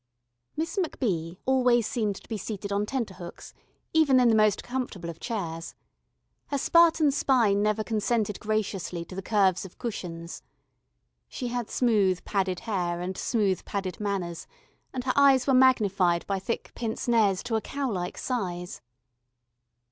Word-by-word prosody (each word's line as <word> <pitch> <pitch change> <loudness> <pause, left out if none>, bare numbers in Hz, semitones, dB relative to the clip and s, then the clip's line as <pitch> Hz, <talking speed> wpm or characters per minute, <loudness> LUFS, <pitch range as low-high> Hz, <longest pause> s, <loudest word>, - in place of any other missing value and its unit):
Miss 325 +5 -2
MacBee 180 - -2
always 250 -3 +3
seemed 215 -4 -1
to - - -13
be 225 - -3
seated 205 0 -5
on 205 +1 0
tenterhooks, 200 -9 -5 0.4
even 295 -5 +5
in 245 -1 +5
the 225 - +4
most 215 -2 +3
comfortable 240 -9 -4
of 165 - -15
chairs. 165 -8 -4 0.7
Her 285 - -1
Spartan 325 0 +5
spine 235 -8 +3
never 215 +1 +1
consented 215 -1 -1
graciously 200 -5 -2
to 185 - -11
the 195 - -4
curves 195 -3 +2
of 190 - -11
cushions. 170 -8 -6 0.9
She 250 - -5
had 240 -2 -3
smooth 205 -7 +2
padded 190 -3 -1
hair 175 -6 -2
and 180 +2 -4
smooth 200 -5 0
padded 190 -3 -4
manners, 190 -5 -3 0.4
and 255 -2 -4
her 255 0 0
eyes 275 -2 +5
were 270 - +3
magnified 200 -9 +4
by 195 -1 -1
thick 230 +5 -4
pince 225 0 -4
nez 210 -6 +3
to 240 -2 -2
a 220 - +1
cow 280 +3 -3
like 180 -2 -3
size. 180 - -3
210 Hz, 150 wpm, -27 LUFS, 185-245 Hz, 0.9 s, even